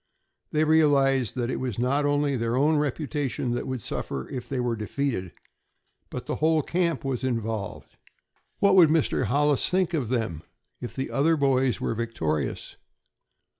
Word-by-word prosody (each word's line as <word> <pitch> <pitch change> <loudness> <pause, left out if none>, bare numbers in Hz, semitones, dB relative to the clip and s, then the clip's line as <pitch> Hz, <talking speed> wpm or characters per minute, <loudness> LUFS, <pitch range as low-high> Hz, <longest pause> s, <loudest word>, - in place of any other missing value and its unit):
They 155 0 +2
realized 140 -6 +3
that 125 -1 -1
it - - -2
was 125 -5 -3
not 135 +4 +1
only 145 -1 +1
their 115 -1 -1
own 150 +3 +3
reputation 145 -3 -2
that 120 - -3
would 130 -5 -4
suffer 65 -1 -4
if 125 -2 -6
they 135 - -2
were 120 -1 0
defeated, 110 -3 -3 0.8
but - - -6
the - - -3
whole 160 -1 +2
camp 170 -4 -1
was 130 -2 -2
involved. 115 -5 -3 0.6
What 200 -1 +4
would 175 -5 +7
Mr. 155 -4 +1
Hollis 145 +4 +2
think 185 -1 +1
of 135 -9 -1
them 110 -11 -2 0.4
if 120 - -7
the 135 - -3
other 160 +4 +2
boys 135 -3 +2
were - - -1
victorious? 80 -11 -3
135 Hz, 160 wpm, -26 LUFS, 120-150 Hz, 0.8 s, would